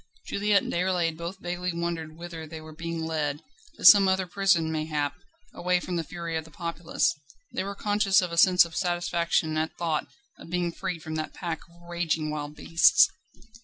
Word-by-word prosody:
Juliette 205 0 +2
and - - -4
Déroulède 175 -2 +1
both 170 +3 -6
vaguely 180 0 -3
wondered 165 -2 -4
whither 170 -2 -8
they 160 +1 -8
were 155 0 -11
being 165 0 -4
led; 155 -2 -2 0.3
to - - -6
some 195 +3 +9
other 190 0 +1
prison 180 -3 +2
mayhap, 155 -2 -1 0.4
away 180 0 +1
from 180 0 -4
the 165 - -1
fury 170 +1 -5
of 160 - -1
the 160 - -15
populace. 170 +1 -1 0.4
They - - -1
were 200 +1 -5
conscious 205 -1 +3
of 180 -2 -1
a 170 - -4
sense 180 0 +7
of 165 -1 -10
satisfaction 170 -3 0
at 160 +1 -2
thought 165 -3 -1 0.3
of - - -12
being 175 0 -1
freed 170 -1 -5
from 160 - -6
that 155 - -4
pack 170 -3 -4
of 170 0 -20
raging 165 -3 -1
wild 150 0 -5
beasts. 170 - +5
170 Hz, 190 wpm, -27 LUFS, 160-180 Hz, 0.4 s, some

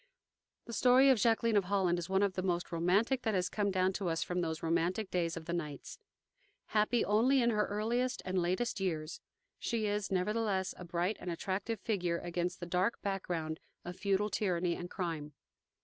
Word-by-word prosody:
The 235 - -8
story 255 +3 +6
of 255 - +3
Jacqueline 230 0 +3
of 200 - +2
Holland 180 -2 +1
is 175 +1 -6
one 190 +1 +3
of 200 -2 +1
the 185 - -2
most 175 -2 -1
romantic 195 +10 +2
that 220 -2 0
has 180 -1 +1
come 205 -1 0
down 190 0 +1
to 185 -2 -2
us 165 -1 0
from 180 0 -2
those 160 -2 -3
romantic 175 +5 0
days 170 -2 0
of 165 - -7
the 170 - -3
knights. 150 -5 -5 0.7
Happy 215 +2 +2
only 240 +6 +4
in 235 -1 +3
her 210 -1 +1
earliest 235 +5 -1
and 185 0 0
latest 185 +7 -1
years, 165 -4 -3 0.4
she 230 -2 -1
is, 205 -1 -1
nevertheless, 195 0 0
a 180 - -9
bright 175 +4 -1
and 180 - -5
attractive 190 +5 -2
figure 180 -6 0
against 175 +1 -3
the 175 - -5
dark 180 +5 0
background 175 -5 -2 0.3
of 175 +1 -5
feudal 200 +2 0
tyranny 180 -4 0
and 175 - -6
crime. 160 -6 -4
185 Hz, 190 wpm, -33 LUFS, 175-210 Hz, 0.7 s, story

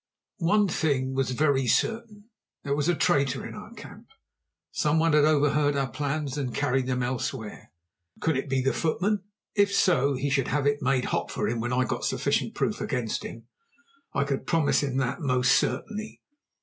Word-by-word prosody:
One 205 +4 +3
thing 140 -6 0
was 135 -1 0
very 135 0 +1
certain, 225 - -1 0.3
there 140 -1 -1
was 145 +3 0
a 175 - +3
traitor 140 -7 +1
in - - -7
our - - -10
camp. - - -12 0.6
Some 150 - +1
one 165 -1 +3
had 150 -1 +5
overheard 145 -1 +2
our 135 -3 -1
plans 145 +1 -2
and 130 -4 -3
carried 135 -2 0
them 125 -1 0
elsewhere. 125 - -4 0.5
Could 160 -2 +1
it 135 +2 -3
be 135 0 +1
the 135 - +1
footman? 195 +5 0 0.3
If 200 -1 +3
so, 145 -8 +3
he 135 +2 -2
should 135 -2 +1
have 145 +1 0
it 145 0 +1
made 130 0 +1
hot - - -2
for - - -2
him 115 0 -1
when 120 +2 -2
I 125 0 +2
got - - -3
sufficient - - 0
proof - - -1
against 125 -4 -2
him; 115 -1 -9 0.7
I 140 - +1
could 140 -1 -3
promise 165 -3 +2
him 135 -3 -2
that 135 +5 -1
most 130 -3 +2
certainly. 215 +8 -1
140 Hz, 185 wpm, -27 LUFS, 130-160 Hz, 0.7 s, had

